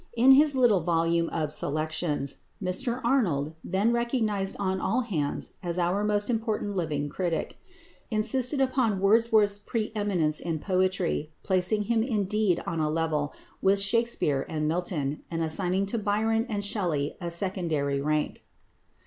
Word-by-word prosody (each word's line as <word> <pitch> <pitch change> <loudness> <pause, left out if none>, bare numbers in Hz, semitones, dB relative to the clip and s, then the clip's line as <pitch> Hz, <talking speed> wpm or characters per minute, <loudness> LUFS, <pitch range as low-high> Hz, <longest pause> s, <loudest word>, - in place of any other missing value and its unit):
In 255 +3 +7
his 285 +1 +6
little 240 -7 +4
volume 165 0 +1
of 155 -2 -2
"Selections" 155 -2 -2 0.2
Mr 235 +6 -1
Arnold, 175 - +1
then 195 +6 +1
recognised 220 -5 0
on 190 -1 -1
all 255 - +1
hands 160 - -2
as 175 -2 -3
our 180 +3 +1
most 205 0 +1
important 220 -3 -1
living 150 -5 -1
critic, 170 +2 -3 0.5
insisted 245 +5 +1
upon 255 -6 +1
Wordsworth's 210 0 +3
pre 215 +1 -3
eminence 180 -8 0
in 165 -2 -2
poetry, 185 -3 0
placing 190 +3 +1
him 225 +2 +1
indeed 210 -5 0
on 165 - -3
a 155 -1 +1
level 155 -2 -1 0.3
with 195 +1 +4
Shakspere 200 - +1
and 155 -1 -1
Milton, 155 -4 -1
and 165 -1 -2
assigning 180 +4 +1
to 220 +4 -2
Byron 220 +3 0
and 205 -2 -2
Shelley 175 -9 -1
a 175 - -3
secondary 165 -6 -1
rank. 150 +1 -1
190 Hz, 140 wpm, -27 LUFS, 160-220 Hz, 0.5 s, In